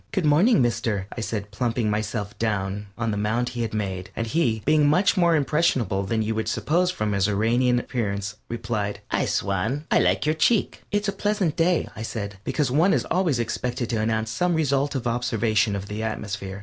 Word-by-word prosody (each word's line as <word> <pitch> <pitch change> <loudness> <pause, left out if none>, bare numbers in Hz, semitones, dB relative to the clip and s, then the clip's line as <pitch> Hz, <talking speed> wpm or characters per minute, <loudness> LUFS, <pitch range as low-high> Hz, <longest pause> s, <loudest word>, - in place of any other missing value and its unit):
"Good 190 -5 0
morning, 155 - +5
mister," 115 -4 -1
I 120 - -4
said, 105 -2 -4
plumping 115 +1 -1
myself 105 0 -3
down 105 -2 -1
upon 115 -1 -1
the 105 - -2
mound 115 +4 0
he 120 -1 -4
had 115 - -2
made, 95 -4 -3
and 115 - -2
he, 115 -5 0
being 150 0 +4
much 180 +7 +3
more 170 -3 +4
impressionable 140 -9 +1
than 110 0 0
you 110 +1 -1
would 110 -1 -2
suppose 170 +10 +1
from 105 -12 -2
his 100 -1 +2
Uranian 120 +4 +2
appearance, 105 -4 -3
replied: 110 -3 -3
"I - - +1
swan, 110 - -1
I - - +5
like - - +2
your 155 - +3
cheek." 195 +7 +1
"It's 205 +1 0
a - - +2
pleasant 205 -7 0
day," 170 0 +2
I 110 - -7
said, 100 -3 -5
because 140 0 0
one 165 +8 +4
is - - +1
always 175 -7 +2
expected 120 +1 -2
to 110 -2 0
announce 110 0 0
some 175 +8 +1
result 140 -2 +1
of 130 - -2
observation 115 -3 +1
of 100 0 -5
the 105 +1 -4
atmosphere. 105 -3 -4
115 Hz, 200 wpm, -24 LUFS, 105-145 Hz, -, morning